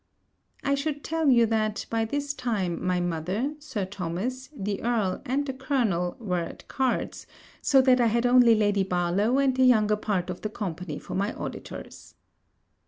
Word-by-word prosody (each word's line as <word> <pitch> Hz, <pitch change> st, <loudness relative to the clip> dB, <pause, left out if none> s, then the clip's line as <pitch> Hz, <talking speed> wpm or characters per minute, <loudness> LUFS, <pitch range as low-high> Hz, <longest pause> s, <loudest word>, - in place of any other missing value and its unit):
I 280 Hz, -, +1 dB
should 285 Hz, +1 st, -2 dB
tell 320 Hz, -2 st, +1 dB
you 235 Hz, -3 st, +6 dB
that, 215 Hz, -1 st, -1 dB
by 225 Hz, -1 st, +1 dB
this 285 Hz, +4 st, -2 dB
time, 210 Hz, -10 st, -2 dB
my 180 Hz, -1 st, +1 dB
mother, 180 Hz, -, -1 dB
Sir 265 Hz, -10 st, -4 dB
Thomas, 200 Hz, +8 st, -4 dB
the 200 Hz, -1 st, -3 dB
Earl, 225 Hz, -6 st, 0 dB
and 275 Hz, +3 st, 0 dB
the 265 Hz, -, -3 dB
Colonel, 235 Hz, -, 0 dB
were 185 Hz, -6 st, -1 dB
at 170 Hz, -, -7 dB
cards, 260 Hz, -2 st, -2 dB, 0.3 s
so 270 Hz, -2 st, +5 dB
that 255 Hz, -1 st, +5 dB
I 235 Hz, -, +4 dB
had 235 Hz, +2 st, +1 dB
only 245 Hz, -2 st, +6 dB
Lady 205 Hz, -2 st, +2 dB
Barlowe 185 Hz, +6 st, +1 dB
and 275 Hz, -2 st, +2 dB
the 260 Hz, -, +3 dB
younger 215 Hz, -4 st, +4 dB
part 190 Hz, -4 st, -1 dB
of 180 Hz, -, -8 dB
the 215 Hz, -, -3 dB
company 180 Hz, -7 st, -5 dB
for -, -, -8 dB
my 200 Hz, +3 st, 0 dB
auditors. -, -, -8 dB
220 Hz, 170 wpm, -26 LUFS, 185-260 Hz, 0.3 s, you